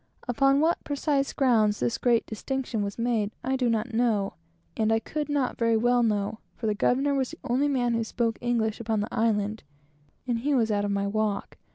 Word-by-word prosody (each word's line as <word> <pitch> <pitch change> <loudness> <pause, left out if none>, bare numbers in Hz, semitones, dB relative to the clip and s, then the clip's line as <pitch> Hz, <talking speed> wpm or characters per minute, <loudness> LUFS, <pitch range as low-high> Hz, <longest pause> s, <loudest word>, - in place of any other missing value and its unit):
Upon 275 +3 +3
what 330 +2 +1
precise 285 -1 0
grounds 220 -6 +2
this 120 -1 -1
great 240 -2 +2
distinction 245 0 -3
was 200 -1 -3
made, 230 -3 0
I 265 +1 0
do 255 -2 +1
not 225 0 -1
know, 225 -4 +1 0.4
and 220 0 +1
I 225 - +4
could 300 +6 -4
not 285 -3 -1
very 230 -1 +3
well 245 +2 +3
know, 215 -1 0 0.2
for 230 - -6
the 215 - +2
governor 270 +7 +1
was 265 -2 0
the - - -10
only 260 +4 +1
man 245 -4 +1
who 230 0 0
spoke 230 0 -1
English 230 -3 0
upon 220 -2 -1
the 210 - -5
island, 215 -1 0 0.6
and 240 -2 -1
he 285 +4 +1
was 225 -3 +2
out 205 -1 +1
of - - -1
my 200 0 0
walk. 210 0 -2
230 Hz, 205 wpm, -27 LUFS, 215-260 Hz, 0.6 s, I